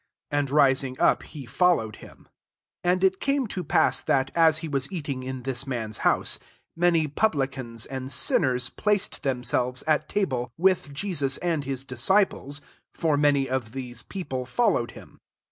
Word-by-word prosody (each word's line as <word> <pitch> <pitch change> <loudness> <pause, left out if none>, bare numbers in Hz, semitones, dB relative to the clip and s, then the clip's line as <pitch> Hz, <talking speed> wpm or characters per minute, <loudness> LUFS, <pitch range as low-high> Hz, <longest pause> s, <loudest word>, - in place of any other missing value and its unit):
And 145 -1 0
rising 135 -2 +3
up, - - +4
he 145 -4 -9
followed 125 - +2
him. - - -15 0.6
15 175 - +3
And 185 +1 0
It 190 0 +3
came 275 -1 +1
to 190 -4 -4
pass, - - +2
that, 135 -1 +1
as 160 -2 +5
he - - -3
was 140 0 -2
eating 145 -7 -4
in 130 -1 -5
this 135 +1 -3
man's 115 -5 -3
house, - - +1 0.4
many 165 -2 +3
publicans 135 - -1
and 130 0 -6
sin 140 - +3
ners 125 -2 0
placed 210 -2 0
themselves 125 -1 -1
at 155 -1 +1
ta 205 -1 +1
ble, 125 -4 -3
with 185 -4 +2
Jesus 140 -4 -1
and 165 -5 -1
his 135 0 -4
disci 165 - +3
ples: 145 +1 -8 0.3
for 160 -3 +1
many 145 -2 +3
of 125 -4 -3
these 125 -3 -6
people 135 -9 -5
followed 240 - +1
him. - - -14
140 Hz, 170 wpm, -26 LUFS, 130-170 Hz, 0.6 s, as